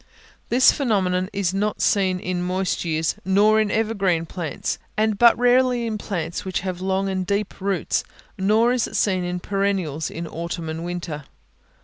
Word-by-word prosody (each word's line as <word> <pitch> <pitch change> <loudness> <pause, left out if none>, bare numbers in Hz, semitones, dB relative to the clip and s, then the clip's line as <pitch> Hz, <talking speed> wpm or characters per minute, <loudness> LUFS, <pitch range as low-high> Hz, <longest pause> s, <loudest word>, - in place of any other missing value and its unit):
This 255 +2 +6
phenomenon 185 -8 0
is 195 -3 -1
not 210 +2 -1
seen 190 -2 +2
in 180 0 -2
moist 185 +1 -1
years, 160 -1 0
nor 210 +3 +4
in 215 - 0
evergreen 200 -6 0
plants, 165 -3 -4 0.2
and 215 0 +2
but 235 +3 +6
rarely 245 0 +3
in 220 -2 -3
plants 170 -5 -4
which 190 -2 -2
have 185 -1 -4
long 190 +1 0
and 190 -1 -1
deep 200 +1 -2
roots, 195 -3 0 0.3
nor 215 +5 +3
is 250 -3 0
it - - -9
seen 185 -3 +1
in 180 0 -3
perennials 190 -6 -1
in 170 +1 -6
autumn 165 0 -5
and 160 +1 -4
winter. 170 -4 -5
190 Hz, 165 wpm, -23 LUFS, 175-210 Hz, 0.3 s, This